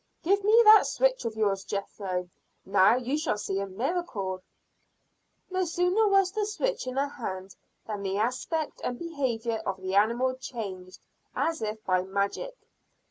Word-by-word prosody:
"Give 395 +3 +2
me 435 +3 +6
that 430 0 +8
switch - - +1
of 225 -1 -3
yours, 200 -3 0
Jethro. 190 -2 -4 0.4
Now, 195 +3 +5
you 255 +4 -1
shall 305 -9 0
see 195 -2 -2
a 200 - -3
miracle." 200 - -3 1.1
No 370 0 +1
sooner 360 +5 +2
was 390 -2 +4
the 420 0 -1
switch 440 - -2
in 255 - -4
her 280 +1 +2
hand, 190 -8 -6 0.3
than 210 -2 -4
the 195 0 -2
aspect 255 +8 -2
and 245 - -2
behavior 240 -9 -2
of 190 -2 -3
the 185 0 -4
animal 235 +6 +3
changed 195 -8 -7 0.3
as 325 -6 0
if 215 0 -4
by 185 -1 +2
magic. 200 - -2
235 Hz, 155 wpm, -28 LUFS, -, 1.1 s, that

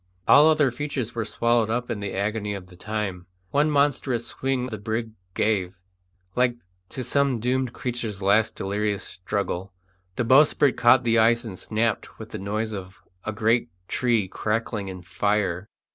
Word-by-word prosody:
All 150 +2 +8
other 150 -4 +3
features 130 -2 -3
were 115 -2 -2
swallowed 115 +1 +1
up 120 +2 -1
in 105 - -3
the 100 -1 -4
agony 105 +1 -1
of 90 -2 -9
the 90 - -14
time. 95 -3 -4 0.2
One 145 +2 +3
monstrous 140 -4 +1
swing 135 -1 -2
the 110 -5 -5
brig 110 +2 -3 0.2
gave, 95 -4 0 0.6
like 125 -1 +2 0.3
to 130 - -4
some 135 0 +1
doomed 125 +2 0
creature's 115 -5 -3
last 105 +3 +3
delirious 100 +1 -1
struggle; 95 0 -3 0.4
the - - 0
bowsprit 140 +2 +5
caught 125 +2 +5
the 115 -1 +3
ice 115 +1 +4
and 100 -6 -7
snapped 110 +1 -1
with 110 0 -10
the 110 - -5
noise 110 +3 -2
of 95 -1 -8 0.2
a 110 - -1
great 115 -1 +1 0.2
tree 115 -6 +1
crackling 105 0 -2
in 90 -1 -7
fire. 95 0 0
110 Hz, 160 wpm, -25 LUFS, 100-125 Hz, 0.6 s, All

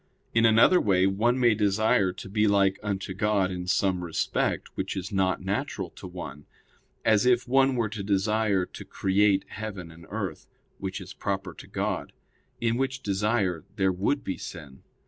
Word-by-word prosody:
In 115 0 +4
another 115 +11 +6
way 95 -2 +3
one 115 +6 +2
may 120 -3 +5
desire 105 -2 +2
to 90 - -9
be 105 +2 +2
like 100 -1 +3
unto 95 -2 -3
God 100 -1 +1
in 90 -1 -5
some 95 -1 +1
respect 85 -2 -1
which - - -3
is 95 0 -4
not 95 -2 +1
natural 100 - -2
to 95 - -10
one; 75 -5 -8 0.6
as 110 +2 +4
if 125 0 +3
one 135 +1 +4
were 115 -3 0
to 105 0 -5
desire 100 0 +1
to - - -10
create 100 0 +2
heaven 100 -6 -6
and 85 +1 -14
earth, - - -4 0.3
which 95 0 -4
is 95 - -9
proper 95 -2 -3
to - - -12
God; - - -3 0.5
in 115 0 +1
which 135 0 -2
desire 100 -4 0
there 95 -3 +2
would 105 +10 0
be 95 - -3
sin. 75 -7 -9
100 Hz, 170 wpm, -27 LUFS, 95-110 Hz, 0.6 s, another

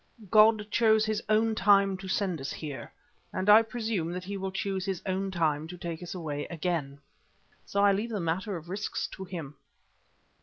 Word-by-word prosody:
God 215 0 +6
chose 220 -2 +4
His 215 0 -1
own 220 +1 +3
time 200 -2 +4
to 190 0 -9
send 190 -5 -1
us 135 - -4
here, 145 -4 -6 0.4
and 185 +1 -3
I 215 +2 +9
presume 220 -7 -2
that 180 0 -5
He 200 +2 -5
will 190 0 -3
choose 195 -1 -2
His 190 -2 -2
own 190 0 -1
time 160 -4 0
to 180 +2 -8
take 170 -1 -5
us 175 +1 -6
away 150 -4 -4
again. 165 -5 -3 0.7
So 200 0 +1
I 200 - +6
leave 210 +4 -1
the 215 -3 -2
matter 180 +4 -2
of 165 0 -11
risks 200 +3 -3
to 190 - -8
Him." 165 -6 -6
190 Hz, 190 wpm, -29 LUFS, 170-210 Hz, 0.7 s, I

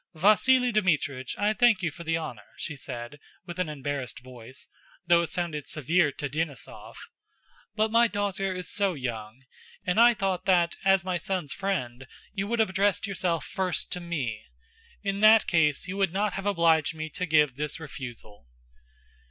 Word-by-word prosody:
"Vasíli 245 +8 +4
Dmítrich, 150 -10 0
I 205 +1 +2
thank 225 -4 +3
you 165 - 0
for 170 +3 -10
the 165 0 0
honor," 115 -10 -7
she 150 - -5
said, 130 +1 -7 0.3
with 175 0 -8
an 180 -4 0
embarrassed 140 -4 -4
voice, 125 0 -12 0.4
though 170 -1 +5
it 170 - -3
sounded 160 -4 -3
severe 155 +1 +1
to 145 - -4
Denísov—"but 160 - -6
my 235 +1 +5
daughter 200 -2 -2
is 180 -2 -5
so 200 -3 0
young, 120 -2 -6 0.4
and 180 +4 +1
I 240 0 +7
thought 195 -3 -1
that, 175 -3 +3
as 195 -2 +3
my 185 -1 0
son's 175 -3 -3
friend, 130 -11 -3 0.3
you 195 -1 -2
would 235 +2 -1
have 220 -4 +2
addressed 200 +3 +1
yourself 180 -5 -1
first 185 -2 -2
to 180 - -3
me. 140 -11 -4 0.6
In 195 0 -1
that 215 +1 +7
case 160 -2 +1
you 190 +2 -5
would 195 -3 +1
not 200 +1 0
have 195 +1 -4
obliged 165 -5 +3
me 155 0 -4
to 180 +5 -3
give 150 -5 +3
this 150 +3 -4
refusal." 120 - -9
170 Hz, 170 wpm, -27 LUFS, 145-195 Hz, 0.6 s, I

